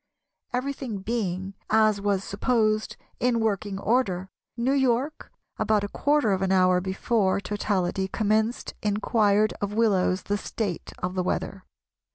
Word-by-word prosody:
Everything 255 -5 -3
being, 195 -4 -2 0.2
as 215 -2 +3
was 200 -1 0
supposed, 215 0 0 0.2
in 245 -1 +2
working 205 -2 -1
order, 195 -4 0 0.3
New 245 +3 +1
York 265 +2 0 0.3
about 215 -2 +2
a - - -1
quarter 285 0 +1
of 190 -1 0
an 190 -1 +1
hour 185 -1 +4
before 190 +1 +1
totality 195 -2 -1
commenced 220 +3 0
inquired 210 0 +2
of 205 0 -2
Willows 195 -4 +2
the 205 0 -1
state 200 -6 -4
of 180 0 -1
the 185 - 0
weather. 185 +1 -3
210 Hz, 135 wpm, -26 LUFS, 190-230 Hz, 0.3 s, hour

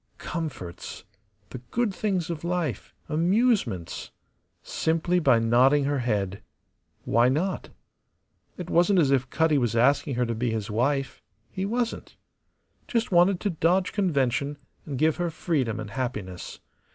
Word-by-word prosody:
Comforts, 150 - -6 0.5
the 130 - -6
good 235 -4 0
things 185 -5 -1
of 160 -2 -5
life, 170 - -2 0.2
amusements 170 - +1 0.5
simply 165 +2 0
by 135 -8 +4
nodding 125 +5 +4
her 140 0 0
head. 105 -4 -1 0.6
Why 120 +2 +4
not? 175 +8 -1 0.9
It 180 - -6
wasn't 175 +3 +3
as 145 -6 +4
if 135 -1 +1
Cutty 160 -1 +2
was 120 -2 0
asking 135 +3 +3
her 125 0 +1
to 115 - -2
be 120 +2 -1
his 110 -2 -3
wife; 135 +5 0 0.3
he 190 +1 -3
wasn't. 235 +2 -3 0.7
Just 230 -3 -1
wanted 175 +1 +4
to 205 - 0
dodge 175 +3 +1
convention, 140 - 0 0.3
and 140 -3 -4
give 155 +3 +2
her 175 -1 -1
freedom 150 - -1
and 105 - -6
happiness. 105 -8 -5
145 Hz, 140 wpm, -26 LUFS, 120-175 Hz, 0.9 s, by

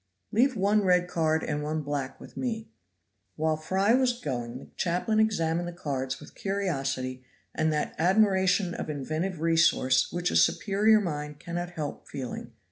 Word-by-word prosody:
"Leave 255 +4 +3
one 205 +1 +3
red 180 -1 +3
card 160 -2 +1
and 150 -1 -2
one 155 +1 -2
black 140 -2 -3
with - - -13
me." 225 -3 -3 0.6
While 160 0 +1
Fry 190 +7 +1
was 250 -1 +2
gong 120 - -4
the - - -11
chaplain 185 +5 0
examined 175 -6 +1
the 175 - -5
cards 135 -5 -3
with - - -13
curiosity 135 -10 -2 0.3
and 155 0 +1
that 150 -1 -1
admiration 190 0 +3
of - - -5
inventive 155 +5 -3
resource 160 -6 +3
which 175 +1 -1
a - - -2
superior 210 +2 +4
mind 150 -5 -4
cannot 175 +1 -5
help 150 -3 -5
feeling. 130 -3 -6
170 Hz, 155 wpm, -28 LUFS, 150-195 Hz, 0.6 s, superior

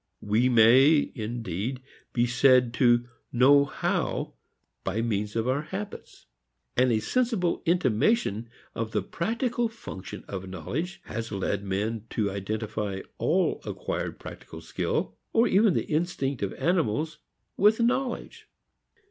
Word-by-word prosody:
We 110 +5 +2
may, 130 +6 +6
indeed, 115 0 -4 0.3
be 120 -1 +2
said 125 0 +4
to 120 0 +3 0.2
know 140 +3 +6
how 140 - -2 0.5
by 105 +4 -1
means 105 -2 -2
of 115 +1 0
our 130 +3 +1
habits. 195 +6 -8 0.5
And 125 0 +4
a 110 - +3
sensible 220 - 0
intimation 130 - +2 0.2
of 115 -1 -4
the 105 - 0
practical 235 - -1
function 160 - -9
of 95 -1 -6
knowledge 170 - -4
has 115 -1 -5
led 100 0 -2
men 105 +3 -2
to 105 -3 +1
identify 105 0 -3 0.2
all 180 +3 +1
acquired - - -4
practical - - -10
skill, - - -2 0.2
or 230 +1 +4
even 200 -1 +4
the - - 0
instinct 150 -4 -1
of 100 - -1
animals, 155 - 0 0.4
with 210 +3 +4
knowledge. 250 +1 -1
125 Hz, 125 wpm, -27 LUFS, 110-175 Hz, 0.5 s, may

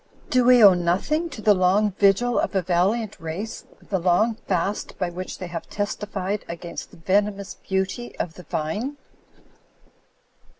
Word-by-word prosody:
Do 255 -1 +4
we 250 -2 +7
owe 200 -2 +10
nothing 185 - 0
to 230 -8 -9
the 210 - +6
long 195 +3 +3
vigil 200 +5 +3
of - - -1
a 190 - +2
valiant 190 +6 0
race, 165 +8 -5 0.2
the 190 - 0
long 180 +6 +3
fast 195 +2 -1
by 180 -2 -2
which 185 +2 -6
they 185 - -6
have 170 -1 -6
testified 205 -1 -3
against 170 0 -6
the - - -16
venomous 200 +3 0
beau^ 190 +5 -2
of 165 - -2
the 180 - -11
Vine? 205 - -3
195 Hz, 155 wpm, -24 LUFS, 180-215 Hz, 0.2 s, owe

